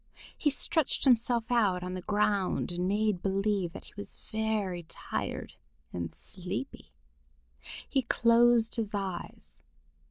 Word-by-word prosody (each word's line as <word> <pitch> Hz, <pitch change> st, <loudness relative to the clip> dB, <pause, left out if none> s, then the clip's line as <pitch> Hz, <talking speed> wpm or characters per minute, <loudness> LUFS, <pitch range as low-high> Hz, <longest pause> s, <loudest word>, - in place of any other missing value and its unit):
He 300 Hz, -, +2 dB
stretched 315 Hz, +1 st, +1 dB
himself 240 Hz, -2 st, +3 dB
out 200 Hz, -7 st, +3 dB
on 180 Hz, 0 st, -4 dB
the 185 Hz, -, -4 dB
ground 205 Hz, -2 st, +1 dB
and 175 Hz, +1 st, -1 dB
made 205 Hz, -2 st, +1 dB
believe 195 Hz, -2 st, 0 dB
that -, -, -8 dB
he -, -, -15 dB
was 205 Hz, -, -9 dB
very 215 Hz, -5 st, -1 dB
tired -, -, -4 dB, 0.4 s
and 85 Hz, -2 st, -3 dB
sleepy. 190 Hz, +8 st, -6 dB, 1.0 s
He 270 Hz, -, +1 dB
closed 235 Hz, -1 st, +4 dB
his 215 Hz, -2 st, -2 dB
eyes. 190 Hz, -3 st, -5 dB
210 Hz, 125 wpm, -30 LUFS, 185-230 Hz, 1.0 s, closed